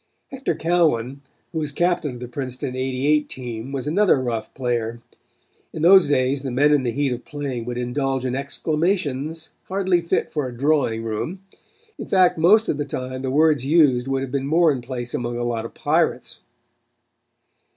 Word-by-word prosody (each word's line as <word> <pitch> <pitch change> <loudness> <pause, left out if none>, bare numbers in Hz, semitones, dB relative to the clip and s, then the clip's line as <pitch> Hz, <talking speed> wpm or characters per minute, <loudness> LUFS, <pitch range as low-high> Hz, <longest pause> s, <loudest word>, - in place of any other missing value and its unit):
Hector 270 - -2
Cowan, 150 -6 +1 0.3
who 160 - -2
was 150 -2 -2
captain 170 -3 0
of 120 - -10
the 125 - -5
Princeton 125 0 -5
'88 135 +4 +1
team 120 0 -6
was 135 -1 -3
another 175 0 +3
rough 120 -3 -3
player. 120 -3 -2 0.7
In 160 - -4
those 185 -1 +7
days 135 -1 +1
the 135 - -4
men 145 +4 +3
in 145 - +3
the 125 - -1
heat 140 +2 0
of 125 0 -4
playing 140 -5 -5
would 125 0 -4
indulge 130 +1 -1
in 125 - -1
exclamations 155 +1 -2
hardly 190 -2 +1
fit 170 - -1
for 150 -4 -2
a 120 -1 -9
drawing 135 -5 +1
room. 135 - -4 0.6
In - - -6
fact 185 -4 +3
most 210 +7 +5
of - - 0
the 145 - -1
time 130 -1 -5
the 130 - -2
words 150 0 +3
used 135 -4 +3
would 135 0 -1
have 135 - -6
been 135 0 -2
more 165 +2 +4
in 130 -3 -3
place 120 0 -5
among 120 0 -2
a 120 - -2
lot 115 -2 -2
of - - -9
pirates. 155 -4 0
135 Hz, 180 wpm, -22 LUFS, 125-160 Hz, 0.7 s, those